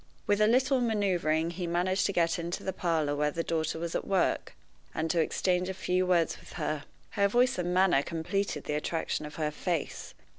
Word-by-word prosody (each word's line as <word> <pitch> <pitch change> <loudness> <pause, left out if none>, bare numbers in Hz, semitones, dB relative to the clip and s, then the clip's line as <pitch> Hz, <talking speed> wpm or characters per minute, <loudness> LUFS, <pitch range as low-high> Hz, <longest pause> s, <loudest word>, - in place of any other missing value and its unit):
With 205 0 +2
a 210 - +6
little 260 +3 +3
maneuvering 180 -8 +1
he 175 0 -4
managed 180 +3 +1
to - - -1
get 170 -2 +1
into 170 +1 -4
the 190 - -2
parlor 160 -5 0
where 150 0 +1
the 165 +3 -3
daughter 160 -1 -1
was 170 0 -4
at - - -2
work, 190 -2 0 0.4
and 160 +1 0
to 170 - +1
exchange 180 +3 +1
a 190 - -4
few 185 0 0
words 170 -3 +2
with - - -14
her. 150 -2 -3 0.3
Her 200 -1 +2
voice 245 +2 +2
and 175 0 -1
manner 180 -5 +4
completed 165 +1 -2
the 150 - -3
attraction 150 0 -2
of 150 - -11
her 155 -2 -1
face. 165 0 -3
175 Hz, 200 wpm, -29 LUFS, 160-190 Hz, 0.4 s, a